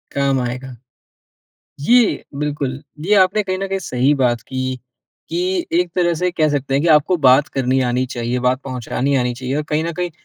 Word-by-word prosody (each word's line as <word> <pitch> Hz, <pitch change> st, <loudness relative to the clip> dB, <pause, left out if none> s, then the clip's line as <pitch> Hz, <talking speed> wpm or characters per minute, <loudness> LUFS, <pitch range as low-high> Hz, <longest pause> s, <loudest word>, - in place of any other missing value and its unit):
काम 140 Hz, -1 st, +1 dB
आएगा। 125 Hz, +1 st, -5 dB, 1.0 s
ये 235 Hz, -, +3 dB
बिल्कुल, 140 Hz, -2 st, -3 dB, 0.2 s
ये 190 Hz, +7 st, +2 dB
आपने 195 Hz, +2 st, +3 dB
कहीं 185 Hz, -1 st, -2 dB
न 195 Hz, +1 st, -3 dB
कहीं 195 Hz, 0 st, -2 dB
सही 135 Hz, -5 st, +1 dB
बात 125 Hz, -3 st, +1 dB
की, 130 Hz, -1 st, -4 dB, 0.5 s
कि 180 Hz, +2 st, -1 dB
एक 180 Hz, 0 st, 0 dB
तरह 175 Hz, -1 st, +2 dB
से 180 Hz, 0 st, +1 dB
कह 155 Hz, -3 st, +1 dB
सकते 140 Hz, -2 st, -2 dB
हैं 140 Hz, -, +2 dB
कि -, -, +1 dB
आपको 150 Hz, +5 st, +3 dB
बात 130 Hz, +3 st, +6 dB
करनी 130 Hz, 0 st, 0 dB
आनी 125 Hz, +1 st, 0 dB
चाहिए, 120 Hz, 0 st, -3 dB
बात 125 Hz, +1 st, +2 dB
पहुँचानी 130 Hz, +1 st, -2 dB
आनी 125 Hz, -2 st, 0 dB
चाहिए 130 Hz, +2 st, -4 dB
और 150 Hz, -, -1 dB
कहीं 155 Hz, +1 st, 0 dB
न 170 Hz, -, -2 dB
कहीं 180 Hz, 0 st, -1 dB
140 Hz, 195 wpm, -19 LUFS, 130-175 Hz, 1.0 s, बात